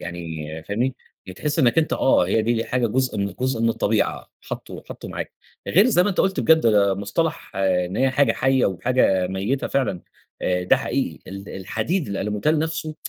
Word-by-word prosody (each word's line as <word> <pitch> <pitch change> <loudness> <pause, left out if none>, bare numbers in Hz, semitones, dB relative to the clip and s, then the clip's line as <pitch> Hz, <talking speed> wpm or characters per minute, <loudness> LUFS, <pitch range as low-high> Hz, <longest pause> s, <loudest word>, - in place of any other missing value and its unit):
يعني 80 -3 -6 0.2
فاهمني؟ 120 +8 -1 0.3
يعني 95 - -8
تحس 150 +1 -2
إنك 130 +2 +4
أنت 160 - +1
آه، 130 -9 +3
هي 110 +4 +2
دي 115 0 0
حاجة 125 -2 0
جُزء 125 -1 -1
من 100 -2 -2
جُزء 130 -3 0
من 115 - +3
الطبيعة، - - 0
حطه - - -7
حطه - - -8
معاك، - - -5 0.3
غير 200 +7 +5
زي 180 -8 +4
ما 205 - +1
أنت 185 - -6
قُلت 190 0 +1
بجد 160 0 +5
ده 100 -3 +4
مصطلح 155 - -2
إن 90 -1 0
هي 130 0 +2
حاجة 140 +2 +3
حية 135 -1 +2
وحاجة 95 -2 +1
ميتة 100 +9 -2
فعلًا، 125 -10 -1 0.4
آآ 90 0 0
ده 90 - +4
حقيقي 120 -11 -2
ال 100 +1 -8
الحديد، 115 - -2
الألموتال 105 +10 0
نفسه 155 0 -3
115 Hz, 185 wpm, -22 LUFS, 95-140 Hz, 0.4 s, غير